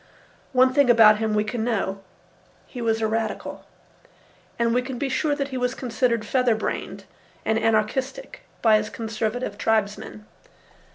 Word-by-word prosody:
One 255 0 +4
thing 280 -2 +4
about 220 -3 +7
him 220 -1 0
we 210 - +2
can 220 +1 -3
know: 200 -4 -1 0.6
he 245 - -8
was 225 -1 0
a 220 - +2
radical. 220 0 -3 0.9
And 235 -1 +1
we 250 - +2
can 255 0 -6
be 275 +2 -2
sure 290 +2 0
that 280 -1 -3
he 260 -2 -4
was 250 +1 -1
considered 235 -2 -1
feather 250 0 +2
brained 220 - -4 0.4
and 220 0 +1
anarchistic 225 - -1 0.2
by 220 -2 +6
his 215 0 -3
conservative 220 0 -3
tribesmen. 210 -1 -1
225 Hz, 155 wpm, -24 LUFS, 215-250 Hz, 0.9 s, about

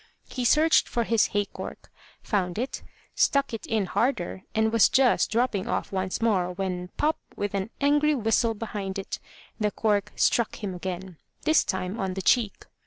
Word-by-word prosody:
He 250 -2 -2
searched 310 +6 +4
for 235 - 0
his 230 -1 +3
hay 205 0 0
cork, - - -9 0.3
found 185 -4 -1
it, 250 +4 -3 0.3
stuck 280 -3 +2
it 225 - -5
in 220 -3 +1
harder, 190 -3 -1
and 220 0 +2
was 230 - +6
just 260 -2 +3
dropping 225 -4 0
off - - -2
once 190 -1 -2
more, 185 -6 +2
when, 180 -1 -3
pop! 310 +2 +1 0.2
with 205 0 -3
an 195 +1 -2
angry 295 +1 +3
whistle 225 -1 +1
behind 205 -3 -4
it, 195 - -5 0.4
the 210 -1 +2
cork 205 -1 0
struck 230 -2 +1
him 195 -2 -2
again, 180 -1 -6 0.3
this 315 0 +4
time 185 +3 -3
on 190 -2 -2
the 190 - -2
cheek. 230 -5 +2
210 Hz, 175 wpm, -26 LUFS, 190-235 Hz, 0.4 s, was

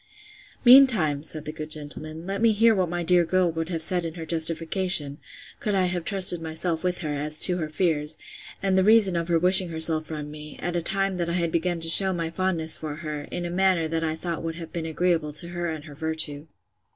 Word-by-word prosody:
Meantime, 235 - +5
said 155 0 -2
the 155 - -5
good 155 0 -9
gentleman, 155 +2 -5
let 195 +2 -5
me 230 -1 +3
hear 225 +2 +3
what 185 -4 -1
my 175 0 -4
dear 175 +1 +3
girl 180 +1 0
would 165 +1 -5
have 165 -3 -4
said 180 +1 +1
in 165 0 -7
her 165 -2 -8
justification, 165 -1 -1 0.4
could 210 -2 -3
I 190 -1 +1
have 175 -1 -4
trusted 190 -4 +4
myself 160 +1 -3
with 180 0 -2
her, 150 -3 -4
as 150 +2 -4
to 180 -1 +4
her 155 -3 -5
fears, 155 -2 -1 0.5
and 195 -1 0
the 190 - +2
reason 210 -3 +5
of 170 0 -3
her 170 -2 +1
wishing 185 +2 +6
herself 160 -1 +2
from 150 -2 -7
me, 150 0 -12
at 175 0 -5
a 175 - -1
time 195 +2 0
that 170 -1 -3
I - - -3
had 170 -2 -2
begun 170 +1 -2
to 165 - +2
shew 190 +3 +7
my 165 -2 -4
fondness 170 -3 -1
for 155 -2 -7
her, 150 -2 -7
in 175 - -6
a 170 - -5
manner 185 -3 0
that 165 0 -3
I 160 -1 -2
thought 170 0 -6
would 165 0 -6
have 165 -1 -10
been 165 -2 -5
agreeable 160 -2 -2
to 170 +3 +2
her 175 0 -5
and 155 -2 -7
virtue. 155 0 -3
165 Hz, 230 wpm, -24 LUFS, 155-180 Hz, 0.5 s, shew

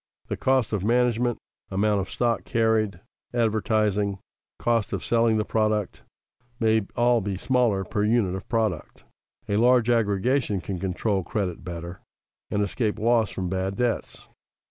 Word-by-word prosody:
The - - -1
cost 130 -4 +1
of 100 -3 -1
management, 120 +1 +2 0.3
amount 100 +1 +1
of 95 - -6
stock 120 -1 0
carried, 110 -3 +1 0.3
advertising, 105 -3 +1 0.4
cost 115 -3 0
of - - -3
selling 115 -1 +3
the 105 - 0
product, 110 -2 0 0.6
may 110 -3 +2
all 120 -1 +3
be 100 -1 -3
smaller 120 -4 +1
per 105 +3 -2
unit 105 -4 +2
of 95 - -7
product. 110 -8 -2 0.4
A 100 - 0
large 120 0 +4
aggregation 115 0 +1
can 90 0 -5
control 95 +2 -1
credit 90 -1 -3
better 85 0 -7 0.5
and 105 - 0
escape 105 +2 -1
loss 115 0 +2
from 95 -1 -4
bad 95 +1 -2
debts. 120 +1 -2
110 Hz, 145 wpm, -25 LUFS, 100-115 Hz, 0.6 s, large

